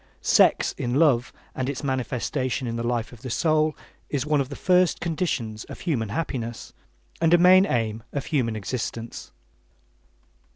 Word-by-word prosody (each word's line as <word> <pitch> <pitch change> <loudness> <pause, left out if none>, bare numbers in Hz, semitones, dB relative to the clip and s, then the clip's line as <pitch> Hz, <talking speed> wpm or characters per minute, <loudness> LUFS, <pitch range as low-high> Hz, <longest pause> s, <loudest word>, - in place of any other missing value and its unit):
Sex - - +4
in 120 +1 -1
love 135 -6 +3 0.2
and 130 0 -2
its 140 0 -4
manifestation 130 -1 -2
in 115 -1 -3
the 115 - -2
life 120 0 -2
of 115 - -14
the 130 - -6
soul 155 +3 +1 0.3
is 140 -2 -1
one 150 -2 +2
of 135 - -4
the 140 - -6
first 180 +1 +3
conditions 145 -10 -2
of - - -10
human 125 - -1
happiness, 120 -3 -4 0.5
and 165 +1 +5
a - - +6
main 185 +2 +6
aim 115 -2 -1
of 140 -1 -3
human 120 -7 0
existence. 115 - -5
130 Hz, 160 wpm, -25 LUFS, 115-155 Hz, 0.5 s, a